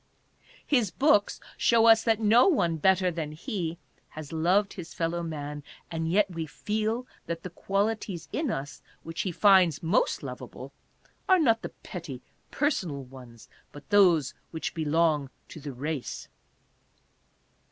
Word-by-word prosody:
His 245 -8 +2
books 260 -3 +2 0.2
show 230 -1 +4
us 225 -1 +7
that 225 -2 +2
no 225 - +5
one 170 - +2
better 185 +2 +3
than 160 -3 -4
he 170 - -4 0.3
has 155 -1 -9
loved 185 +6 +2
his 170 -4 -9
fellow 170 0 -1
man, 150 -3 -5 0.3
and 165 0 -2
yet 200 +2 +4
we 165 -2 -4
feel 220 +8 -2 0.2
that 170 0 -4
the 185 - -6
qualities 195 -3 -2
in 300 -3 -1
us 145 -8 -5 0.2
which 165 0 -4
he 190 - -2
finds 180 -5 +4
most 175 - +1
lovable - - -8 0.6
are 375 - +7
not 230 -9 +3
the - - -5
petty 155 - -9 0.3
personal 180 - -1
ones, 125 -3 -14 0.2
but 145 -1 -13
those 175 -9 +4 0.2
which 160 - -4
belong 155 -2 +1 0.2
to - - -9
the 145 -1 -6
race. 140 +1 -5
170 Hz, 140 wpm, -28 LUFS, 155-210 Hz, 0.6 s, us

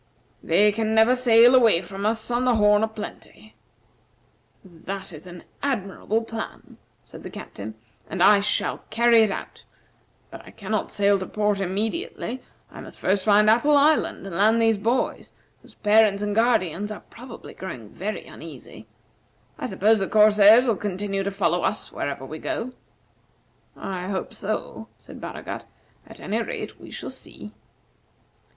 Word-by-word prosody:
They 210 0 +3
can 220 +1 -1
never 220 +3 +5
sail 245 -1 +5
away 225 -8 +5
from 195 +3 -4
us 225 +2 -2
on 240 +1 +1
the 250 -2 +3
'Horn 210 0 +4
o' - - +2
Plenty.'" 215 0 -10 1.1
"That 190 +2 -8
is 155 +3 -11
an 175 -1 -11 0.2
admirable 220 -3 -2
plan," 225 0 -8 0.3
said - - -12
the - - -8
Captain, 110 +2 -9 0.3
"and 185 -2 0
I 205 +1 +7
shall 200 - 0
carry 235 +1 +4
it 220 -1 +4
out; 195 - -7 0.7
but - - -9
I - - -13
cannot 215 0 -4
sail 200 -1 +2
to 185 - -5
port 210 -1 0
immediately. 225 - -3 0.3
I - - -10
must - - -12
first 190 0 +1
find 210 0 +4
Apple 265 +7 +4
Island 295 -6 +2
and 190 -3 -7
land 215 +5 +3
these 225 -2 +2
boys, 235 +5 -1 0.3
whose - - -19
parents 210 -1 +3
and 205 0 -1
guardians 210 -4 +1
are 210 - -7
probably 240 0 -11
growing 130 - -8
very 205 - -5
uneasy. 155 -6 -11 0.7
I - - -3
suppose 215 +2 +2
the 195 - -1
corsairs 215 +2 +6
will 230 -5 +1
continue 195 -1 -3
to 195 - -2
follow 180 -3 0
us - - -2
wherever 140 -1 -4
we 155 +3 -8
go." 255 +3 -4 1.0
"I 185 -1 -5
hope 190 -1 -4
so," 215 +2 -5
said - - -11
Baragat; - - -7 0.4
"at - - -13
any - - -2
rate - - -6
we - - -11
shall - - -7
see." - - -11
210 Hz, 160 wpm, -24 LUFS, 195-225 Hz, 1.1 s, I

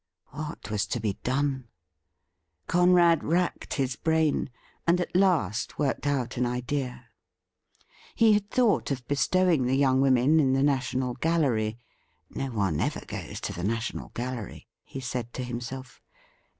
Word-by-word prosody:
What 150 -7 -7
was 105 -1 0
to 120 - -2
be 105 -3 -2
done? 135 -1 -1 1.0
Conrad 175 -2 +4
racked 175 +3 -1
his 135 -2 -1
brain, 160 -2 +1 0.4
and 175 +1 +4
at 175 - -3
last 170 - +1
worked 145 0 -1
out 130 -5 -1
an 125 - +1
idea. 125 0 -3 1.1
He 225 -2 +5
had 205 0 0
thought 240 -4 +2
of 130 -3 -4
bestow 185 +6 +2
ing 150 -8 +3
the 130 - +2
young 135 -1 +3
women 135 +3 +4
in 135 -3 +3
the 135 +1 +2
National 130 -2 0
Gallery 125 -7 0 0.2
— - - -41
' - - -46
No 135 - -3
one 100 - -1
ever - - -2
goes - - -6
to - - -3
the 85 - -6
National 115 +4 -2
Gallery,' 120 -4 -5 0.2
he 135 - -8
said 120 -2 -4
to 130 - -3
himself. 125 +2 -6
130 Hz, 155 wpm, -27 LUFS, 120-160 Hz, 1.1 s, He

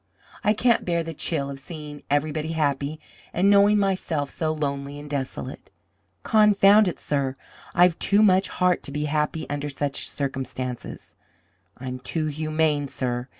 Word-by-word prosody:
I 210 - +4
can't 235 +2 +2
bear 170 -1 0
the 165 0 -6
chill 140 -2 -1
of 135 - -7
seeing 150 0 -9
everybody 155 +2 0
happy, 145 -1 -1 0.3
and 195 +3 +3
knowing 205 +1 +6
myself 185 -7 0
so 160 -1 -1
lonely 140 -2 -3
and 145 - -9
desolate. 135 - -4 0.5
Confound 210 -1 +5
it, 180 - -3
sir, 140 -2 -1 0.4
I've 175 -1 +4
too 205 +2 +3
much 190 -1 +4
heart 180 -1 +1
to - - -7
be 150 +1 -2
happy 150 +1 -1
under 145 0 -3
such 140 0 -2
circumstances! 130 -2 -5 0.6
I'm 130 0 -6
too 155 +5 -2
humane, 155 -1 0
sir! 125 -2 -3
150 Hz, 150 wpm, -24 LUFS, 140-175 Hz, 0.6 s, knowing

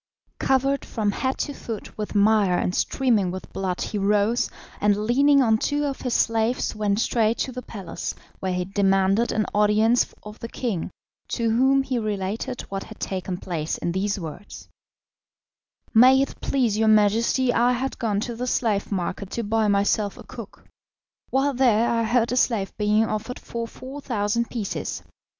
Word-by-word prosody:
Covered 270 +1 +1
from 210 -3 -1
head 260 +5 -2
to 285 - -6
foot 225 -6 -7
with 210 0 -5
mire 205 -3 +4
and 180 - -1
streaming 225 -8 +1
with 185 +1 -7
blood 185 -2 -2
he 210 - -2
rose, 210 +4 +2 0.3
and 205 -1 +3
leaning 280 +4 +4
on 220 -2 +3
two 290 +3 0
of 275 -2 -3
his 250 -2 -1
slaves 225 +1 +1
went 210 -1 0
straight 225 -1 +1
to 260 - -2
the 250 0 -6
palace, 210 -5 -6 0.2
where 190 - -2
he 180 0 -1
demanded 195 +3 +2
an 215 -1 0
audience 210 +3 +3
of 210 +1 -10
the 230 - -5
king, 230 -7 -3 0.4
to 230 -2 0
whom 265 +4 +3
he 260 -2 -1
related 215 +3 -3
what 195 0 -6
had - - -12
taken 185 -1 -3
place 165 -4 -3
in 170 - -2
these 200 +3 -1
words: 170 +4 -9 1.3
"May 255 +3 +7
it 275 - -2
please 235 -6 +1
your 220 - +3
Majesty, 220 +4 +3
I 245 +1 +3
had 260 +2 -3
gone 215 -5 0
to 240 +1 -4
the 250 +2 -4
slave 215 -5 0
market 190 +1 -3
to 235 - -2
buy 220 +1 +1
myself 200 0 +1
a - - -10
cook. 230 -5 -11 0.6
While 275 +2 +1
there 240 -3 +3
I 230 -1 +1
heard 235 +1 +2
a 250 - 0
slave 220 -6 +1
being 210 +1 +2
offered 220 +3 -4
for 230 0 -5
4,000 235 -4 -3
pieces. 220 -5 -4
220 Hz, 170 wpm, -24 LUFS, 200-245 Hz, 1.3 s, May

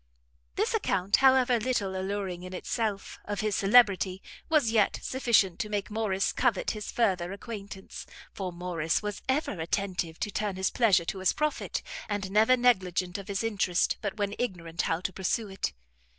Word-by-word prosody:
This - - 0
account, 185 +2 +2
however 260 -2 +5
little 215 -5 -1
alluring 190 -1 -3
in 185 0 -7
itself, 210 0 -3
of 205 -1 -3
his 215 -2 0
celebrity, 195 -3 +4 0.3
was 300 -8 +3
yet 215 -3 +2
sufficient 225 -9 +2
to 210 - -2
make 205 -1 -2
Morrice 210 -3 0
covet - - +1
his 215 -2 -6
further 185 -6 +1
acquaintance; 200 -1 -8 0.3
for 190 -2 -4
Morrice 175 -1 -1
was 210 -1 -4
ever 290 +4 +1
attentive 170 -1 -2
to 205 - -1
turn 205 -1 -2
his 190 0 0
pleasure 195 -8 +3
to 190 - -3
his 185 - +2
profit, 305 0 -2 0.3
and 200 -2 -2
never 220 +5 +5
negligent 185 -6 +1
of 195 - -9
his 200 +1 -2
interest, 195 -5 +1
but 205 0 -3
when 205 -1 -1
ignorant 175 -8 -2
how 165 +1 -1
to 190 - -3
pursue 200 +4 -1
it. 195 - -2
200 Hz, 165 wpm, -28 LUFS, 185-220 Hz, 0.3 s, however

